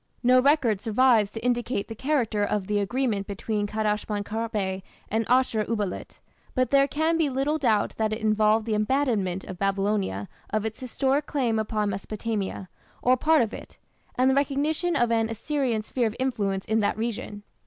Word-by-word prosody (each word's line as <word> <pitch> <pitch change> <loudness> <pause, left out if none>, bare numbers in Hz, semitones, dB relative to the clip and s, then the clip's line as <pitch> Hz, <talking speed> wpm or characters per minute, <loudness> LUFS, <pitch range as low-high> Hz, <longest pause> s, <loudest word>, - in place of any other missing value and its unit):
No 250 +1 +6
record 260 -8 +3
survives 225 -1 +3
to 225 +2 -7
indicate 240 -3 0
the 225 - -6
character 230 -4 0
of 205 -1 -1
the 205 +1 0
agreement 215 -1 -1
between 205 +1 -2
Kadashman 210 -1 -1
Kharbe 210 -3 -2 0.3
and 220 +1 0
Ashur 250 -3 +3
uballit, 210 -5 -3 0.4
but 255 -2 +1
there 275 0 +5
can 320 +3 0
be 310 -3 +2
little 275 +4 0
doubt 220 -7 +2
that 220 -1 0
it 215 - -1
involved 215 0 +2
the 225 - -1
abandonment 210 -5 0
by - - -6
Babylonia 195 - -1 0.2
of 215 0 -1
its 220 0 -4
historic 270 +3 0
claim 240 -7 0
upon 215 -1 -1
Mesopotamia, 200 -1 -4 0.4
or 250 +1 +5
part 310 +2 +3
of 225 - -4
it, - - -10 0.4
and 255 +1 +3
the 265 - +4
recognition 295 +5 0
of 240 -4 +2
an 225 -1 +2
Assyrian 235 -1 -1
sphere 240 +1 0
of 220 - -5
influence 205 -7 -1
in 220 +1 +1
that 210 0 0
region. 220 -2 -4
225 Hz, 175 wpm, -26 LUFS, 210-260 Hz, 0.4 s, No